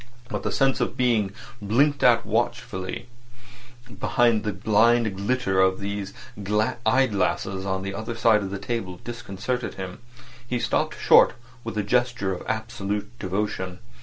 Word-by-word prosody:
But - - -3
the - - -2
sense 135 -1 +2
of - - -1
being 115 -6 +2 0.3
blinked 135 +8 +2
at 120 -1 +5
watchfully 115 -1 -2 0.9
behind 115 -2 +2
the 105 - -1
blind 110 +2 +3
glitter 100 -1 0
of 95 0 +3
these 100 0 -4 0.3
eye 120 +6 +2
glasses 95 -3 -1
on 95 0 -1
the 100 0 -4
other 110 +3 -4
side 115 -2 +4
of 100 - -4
the 100 - -4
table 95 -5 -4
disconcerted 120 +1 -4
him. 95 0 -6 0.5
He 125 0 -1
stopped - - 0
short - - +6 0.3
with 115 -1 -5
a 105 - +1
gesture 120 -3 +1
of 90 - -6
absolute 105 -1 -3
devotion. 95 -1 -2
105 Hz, 145 wpm, -25 LUFS, 95-120 Hz, 0.9 s, short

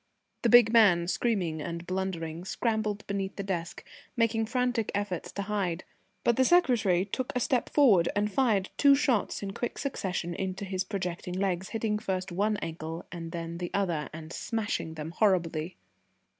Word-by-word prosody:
The 235 - +2
big 240 -1 +7
man, 190 -7 +5
screaming 180 -7 0
and 170 +2 -5
blundering, 175 -3 -3
scrambled 215 0 -1
beneath 195 -1 -3
the 200 - -4
desk, 175 -3 -4 0.3
making 225 -1 +2
frantic 245 -2 0
efforts 205 -4 -3
to 200 - -3
hide, 195 -4 -2 0.4
but 235 - +3
the 260 - +5
secretary 240 - +3
took 250 +5 -3
a - - +2
step 250 0 +1
forward 210 - +5
and 205 +1 +1
fired 215 -7 +2
two 280 -1 +7
shots 255 -8 0
in 195 -1 -4
quick 240 - -4
succession 185 - -3
into 190 +2 -3
his 190 -1 -2
projecting 180 -3 -4
legs, 190 -1 -1
hitting 220 -2 -1
first 190 -3 -3
one 205 +4 +1
ankle 165 0 -5
and 165 -2 -6
then 170 0 -5
the 175 -1 -3
other, 175 -7 0
and 160 +1 -9
smashing 210 -8 -3
them 155 +1 -5
horribly. 175 -3 +1
195 Hz, 165 wpm, -29 LUFS, 175-220 Hz, 0.4 s, big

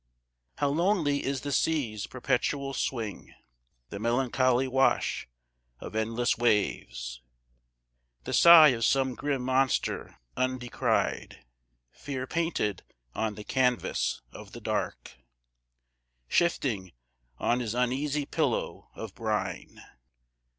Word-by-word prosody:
How 145 - +1
lonely 160 -2 +1
is 135 -1 -2
the 145 - -4
sea's 130 -10 0
perpetual 135 +2 -1
swing, 115 -7 -4 0.5
The 100 - -6
melancholy 130 +2 +2
wash 135 +1 +1 0.5
of - - -8
endless 115 +3 0
waves, 65 - 0 1.0
The - - -5
sigh 170 -3 +9
of 115 -3 -1
some 130 +1 +2
grim 140 0 -2
monster 130 +1 0 0.2
undescried, 130 - -1 0.5
Fear 135 -3 -5
painted 165 - -1 0.3
on 110 -2 -2
the 105 - -8
canvas 125 - 0
of - - -12
the - - -8
dark, - - -3 1.1
Shifting 115 - 0 0.4
on 120 - +1
his 115 -2 -3
uneasy 135 +4 0
pillow - - -2
of 110 -4 -7
brine! 105 -5 -3
130 Hz, 100 wpm, -28 LUFS, 110-140 Hz, 1.1 s, sigh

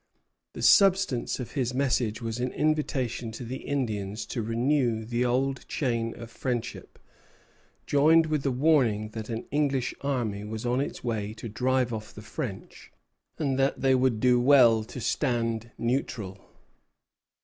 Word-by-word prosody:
The - - -6
substance 190 -13 +4
of 125 - -6
his 125 -3 -2
message 125 -4 0
was 115 +1 -3
an 125 +1 -1
invitation 140 -6 -1
to 125 - -7
the 130 +3 -5
Indians 110 -7 -3
to 120 - -1
renew 115 0 0
the 120 +2 -1
old 130 +2 0
chain 115 -5 -1
of 115 -1 -9
friendship, 120 -1 -4 0.9
joined 160 +3 +5
with 155 -3 -1
a - - +2
warning 125 -6 +2
that 110 0 -7
an 115 0 -4
English 140 -3 0
army 120 -8 -2
was 110 +2 -6
on 125 +2 +1
its 140 - -5
way 110 -3 -3
to 115 - -7
drive 125 +2 0
off 110 -1 -7
the 105 - -9
French, 110 -5 -7 0.5
and 135 -4 -1
that 135 +1 +1
they 135 -1 +4
would 130 -3 +2
do 125 +1 +4
well 120 -4 +6
to 125 - -8
stand 115 -1 -1
neutral. 115 -6 -2
125 Hz, 150 wpm, -27 LUFS, 115-135 Hz, 0.9 s, well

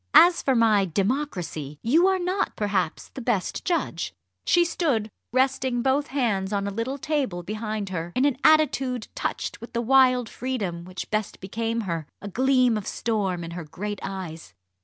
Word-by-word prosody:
As 345 0 +8
for 265 - +2
my 220 -4 +4
'democracy,' 185 - -2
you 320 +11 +4
are 380 0 +3
not 370 +2 -1
perhaps 195 -6 -1
the 265 - -8
best 230 -6 -1
judge." 345 -2 -1 0.3
She 345 0 +5
stood 265 - 0 0.2
resting 260 -1 +1
both 275 +2 +2
hands 220 -9 0
on 200 -1 0
a - - -2
little 230 +7 -3
table 275 - -1
behind 215 +1 -3
her, 170 -2 -4
in 255 - +3
an 280 -3 +2
attitude 265 -6 +3
touched - - -3
with 235 - -10
the 235 - 0
wild 255 -1 +5
freedom 200 -11 -3
which 185 +1 -7
best 215 -1 -2
became 225 +4 -2
her, 165 -7 -3
a 205 - -7
gleam 255 +1 +3
of 200 - -9
storm 195 -6 -1
in 165 - -6
her 175 0 -5
great 205 +6 -5
eyes. 165 - -6
225 Hz, 170 wpm, -25 LUFS, 190-265 Hz, 0.3 s, As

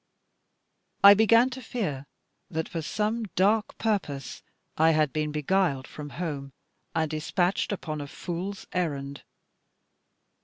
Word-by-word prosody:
I 200 0 +12
began 230 +4 +5
to 260 +1 -7
fear 155 - -3 0.4
that, 160 -3 -2
for 165 - -4
some 215 +7 -1
dark 210 +4 +2
purpose, 180 - -2 0.3
I 160 +1 +4
had 155 -3 +2
been 150 -1 -1
beguiled 150 -2 +1
from 150 -1 -8
home, 145 -6 -4 0.4
and 160 -1 0
despatched 175 +6 0
upon 155 -6 -4
a 145 - -6
fool's 185 +6 -5
errand. 140 -6 -2
165 Hz, 120 wpm, -27 LUFS, 150-200 Hz, 0.4 s, I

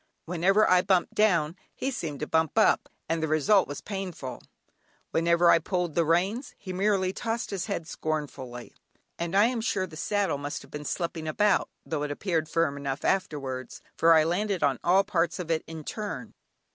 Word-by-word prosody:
Whenever 185 +5 +3
I 180 0 +5
bumped 185 -1 +1
down, 170 -7 +2 0.2
he 270 - -2
seemed 155 - -5
to - - 0
bump 160 -1 +1
up, - - +4 0.2
and 165 0 -1
the 160 - 0
result 155 +6 +3
was 145 - -6
painful; 180 - -5 0.7
whenever 170 +1 +4
I 165 - +6
pulled 175 -1 -2
the 170 - +3
reins 190 - 0
he 185 - -7
merely 190 -1 +1
tossed 230 +1 -3
his 195 -3 -3
head 165 - -3
scornfully; 140 -7 -5 0.5
and 170 +2 -2
I 205 - +7
am 240 -1 0
sure 200 -4 0
the 165 -4 -12
saddle 195 -3 0
must 145 0 -5
have - - -17
been 150 0 -6
slipping 165 0 -3
about 205 +6 +2 0.2
(though 155 -3 -2
it 150 - -2
appeared 160 0 -1
firm 155 -4 +1
enough 140 -1 -4
afterwards), 135 -9 -2 0.2
for 165 0 +6
I 155 - +6
landed 190 +3 0
on 135 -3 +2
all 185 +3 +5
parts 170 -3 0
of 170 -2 -4
it 160 -1 +1
in 160 -1 -7
turn. 210 +6 -5
170 Hz, 185 wpm, -27 LUFS, 155-195 Hz, 0.7 s, I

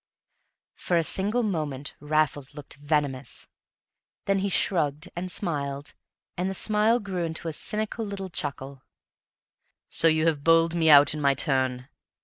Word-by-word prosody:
For 175 - -1
a 165 - +2
single 210 +8 0
moment 150 -9 -3
Raffles 150 -2 -1
looked 145 -2 -9
venomous; 145 -3 -1 0.8
then 195 0 +1
he 200 +1 -1
shrugged 155 -5 0
and 180 +1 -4
smiled, 145 -7 -3 0.4
and 180 +2 -2
the 195 - -5
smile 215 +4 +3
grew 190 -5 -4
into 165 0 -4
a - - 0
little - - -5
cynical 210 0 -3
chuckle. 135 -3 -5 1.1
"So 165 - +4
you 160 0 +2
have 155 -4 0
bowled 165 +1 +4
me 165 -2 +2
out 145 -1 +7
in 155 - -5
my 140 -1 +3
turn?" 130 -2 0
160 Hz, 145 wpm, -26 LUFS, 145-190 Hz, 1.1 s, out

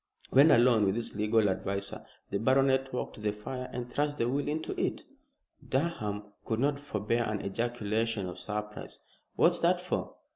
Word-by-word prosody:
When 140 +4 +7
alone 120 -5 +5
with 95 - +1
his 115 -2 -4
legal 105 +1 +3
adviser 100 +1 -3 0.3
the 100 - 0
baronet 135 +2 +3
walked 125 - -3
to - - -10
the 105 -1 +1
fire 125 +5 -6
and 120 -1 -4
thrust 145 +3 -1
the 115 - +1
will 140 +3 -1
into 155 +2 -2
it. - - -1 0.7
Durham 120 -9 -1 0.2
could 110 -1 -2
not 140 +2 +1
forbear 115 -3 -1
an 105 -2 -2
ejaculation 110 -1 -1
of 90 0 -7
surprise, 105 +3 -5 0.4
"What's - - +4
that - - +3
for?" - - -3
115 Hz, 170 wpm, -30 LUFS, 105-130 Hz, 0.7 s, When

